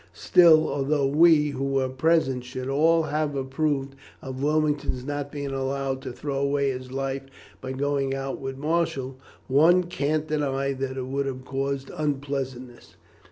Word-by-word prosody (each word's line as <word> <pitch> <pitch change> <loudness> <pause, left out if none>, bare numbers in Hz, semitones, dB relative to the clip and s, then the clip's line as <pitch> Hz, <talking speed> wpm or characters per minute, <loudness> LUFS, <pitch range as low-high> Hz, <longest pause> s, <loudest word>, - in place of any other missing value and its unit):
Still, 165 - +6
although 140 0 0
we, 150 +1 +5
who 135 -1 -4
were 135 -1 +1
present, 130 -1 +1
should 130 +1 -6
all 160 +4 +3
have 150 -1 -1
approved 135 0 -1 0.3
of 130 -1 -7
Wilmington's 150 -3 0
not 145 0 -4
being 140 -2 -4
allowed 135 0 -2
to - - -6
throw 135 +2 -4
away 140 0 +1
his 130 0 -7
life 135 0 -2 0.4
by 130 0 -5
going 140 0 -1
out 135 0 -4
with 135 -1 -5
Marshall, 150 -4 -1 0.3
one 165 +7 +5
can't 155 -2 -1
deny 140 -3 -1
that 135 0 -4
it 130 - -3
would 140 +1 -2
have 130 -1 -5
caused 135 0 -3
unpleasantness. 135 -4 -4
140 Hz, 155 wpm, -25 LUFS, 135-150 Hz, 0.4 s, Still